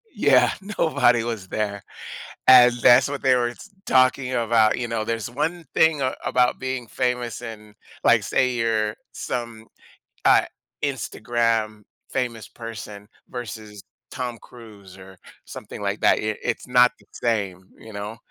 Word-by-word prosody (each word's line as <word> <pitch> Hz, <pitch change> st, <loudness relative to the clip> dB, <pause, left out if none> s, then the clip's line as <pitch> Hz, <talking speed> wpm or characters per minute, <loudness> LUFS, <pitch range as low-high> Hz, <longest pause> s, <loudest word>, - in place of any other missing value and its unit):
Yeah, -, -, +4 dB, 0.3 s
nobody 125 Hz, -7 st, +3 dB
was 115 Hz, -5 st, -5 dB
there, 100 Hz, -2 st, -3 dB, 0.7 s
and 125 Hz, -1 st, +9 dB
that's 125 Hz, +2 st, +6 dB
what 145 Hz, -1 st, -5 dB
they 130 Hz, -2 st, +4 dB
were 120 Hz, -1 st, 0 dB
s 210 Hz, -, -13 dB, 0.2 s
talking 130 Hz, 0 st, +3 dB
about, 115 Hz, -2 st, +3 dB
you 120 Hz, -, -2 dB
know. 115 Hz, -2 st, -2 dB
There's 115 Hz, 0 st, -3 dB
one 165 Hz, +7 st, -2 dB
thing 160 Hz, -3 st, +3 dB
a 130 Hz, -, 0 dB
about 125 Hz, -1 st, +2 dB
being 130 Hz, -2 st, -4 dB
famous 125 Hz, -2 st, -2 dB
and, 105 Hz, -3 st, -9 dB, 0.3 s
like, -, -, +5 dB
say, 130 Hz, -1 st, +1 dB
you're 110 Hz, -2 st, 0 dB, 0.2 s
some, 115 Hz, -2 st, -5 dB, 0.6 s
uh, -, -, +5 dB, 0.4 s
Instagram 115 Hz, -4 st, -1 dB, 0.3 s
famous 120 Hz, -4 st, -3 dB
person 105 Hz, -3 st, -9 dB, 0.2 s
versus 110 Hz, -4 st, -8 dB, 0.3 s
Tom 125 Hz, -2 st, -4 dB
Cruise 105 Hz, -6 st, -14 dB
or 95 Hz, 0 st, -14 dB, 0.3 s
something -, -, -9 dB
like -, -, -2 dB
that, -, -, +4 dB
it 110 Hz, 0 st, -2 dB
it's -, -, -3 dB
not 125 Hz, 0 st, +5 dB
the -, -, -23 dB
same, 100 Hz, -5 st, -2 dB
you 110 Hz, -, -12 dB
know? 105 Hz, +2 st, -6 dB
115 Hz, 145 wpm, -23 LUFS, 110-125 Hz, 0.7 s, and